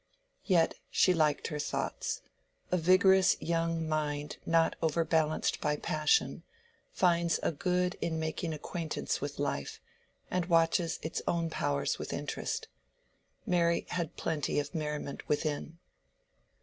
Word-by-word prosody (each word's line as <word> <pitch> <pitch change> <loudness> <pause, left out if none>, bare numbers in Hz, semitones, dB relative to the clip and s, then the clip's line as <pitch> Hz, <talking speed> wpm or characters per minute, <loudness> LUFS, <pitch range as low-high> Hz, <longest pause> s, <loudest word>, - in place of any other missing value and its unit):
Yet 175 -5 +3 0.2
she 185 - +4
liked 155 -4 +1
her 150 - -4
thoughts: 145 - -2 0.5
a 180 - +3
vigorous 185 +2 +5
young 165 -1 -1
mind 150 -1 -2
not 165 0 +3
overbalanced 160 -1 +1
by 150 0 +1
passion, 155 - +1 0.5
finds 170 - +2
a - - +2
good 180 +3 0
in 160 -1 -1
making 160 +1 -2
acquaintance 160 +1 -3
with 145 0 -4
life, 140 - -2 0.5
and 180 -1 0
watches 165 0 +3
its 160 - -3
own 165 -1 0
powers 145 -2 0
with - - -5
interest. - - -3 0.8
Mary 170 -1 +2
had 170 -2 -3
plenty 150 -2 -1
of 145 0 -4
merriment 150 -3 -4
within. 150 +2 -1
165 Hz, 125 wpm, -31 LUFS, 150-170 Hz, 0.8 s, vigorous